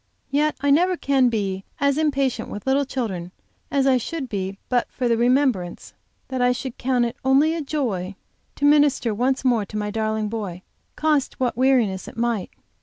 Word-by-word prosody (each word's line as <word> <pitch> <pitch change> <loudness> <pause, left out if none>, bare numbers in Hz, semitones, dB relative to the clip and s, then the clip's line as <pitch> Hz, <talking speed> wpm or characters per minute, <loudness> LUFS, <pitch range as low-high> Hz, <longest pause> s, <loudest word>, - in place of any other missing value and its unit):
Yet 300 +2 +2
I 285 0 +2
never 355 +5 +3
can 270 -4 +3
be 195 -4 -2 0.2
as 280 -1 +2
impatient 275 -4 0
with 205 - -7
little 275 +1 +2
children 200 -10 -4 0.4
as 275 -1 +1
I 265 -1 +4
should 265 +2 -4
be 195 -2 -3
but 245 -1 0
for 250 - -1
the 235 - +3
remembrance 240 -7 +1 0.4
that 260 -1 -2
I 245 0 +4
should 250 0 -6
count 250 -1 +1
it 235 - -4
only 275 +4 +4
a 330 - -2
joy 225 - -2 0.4
to 285 - -1
minister 290 -6 +4
once 260 +5 0
more 240 -4 +3
to 215 - -6
my 210 0 -2
darling 220 0 -1
boy, 200 -5 -5 0.3
cost 300 -3 0
what 250 -2 0
weariness 240 -8 +2
it - - -11
might. 230 -4 -1
250 Hz, 180 wpm, -23 LUFS, 215-275 Hz, 0.4 s, I